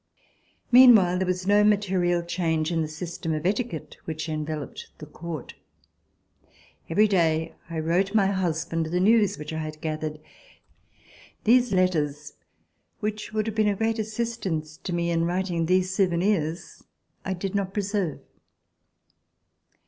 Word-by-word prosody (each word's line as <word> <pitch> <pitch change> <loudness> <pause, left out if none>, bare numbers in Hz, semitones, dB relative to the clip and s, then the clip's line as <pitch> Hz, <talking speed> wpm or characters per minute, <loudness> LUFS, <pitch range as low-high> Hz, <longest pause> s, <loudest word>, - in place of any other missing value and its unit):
Meanwhile 225 -8 +7
there 190 - -1
was 185 0 -1
no 205 +1 +4
material 185 -4 +2
change 165 -2 -1
in 165 -1 0
the 155 - -1
system 160 0 -4
of 155 +2 -4
etiquette 200 -3 -2
which 160 0 -4
enveloped 155 -2 -5
the - - -9
Court. 160 +1 -7 1.4
Every 210 +6 +4
day 165 -4 +1 0.2
I 165 - -5
wrote 185 +6 0
my 205 -3 +5
husband 165 -4 -1
the 175 +3 -1
news 205 0 +3
which 150 +1 -7
I 160 - -3
had 155 -1 -6
gathered. 155 -1 -4 1.2
These 245 +1 +4
letters, 150 -6 0 0.7
which 215 -1 -4
would 215 -1 -1
have 220 -1 -4
been 215 -1 +3
of 200 - -1
great 225 +1 0
assistance 215 -8 -3
to - - -6
me 170 0 0
in 165 0 +1
writing 175 -2 -1
these 185 +1 +2
souvenirs, 180 -3 0 0.4
I 190 - -2
did 185 +1 -4
not 200 -2 -1
preserve. 200 -5 -2
180 Hz, 140 wpm, -25 LUFS, 160-205 Hz, 1.4 s, Meanwhile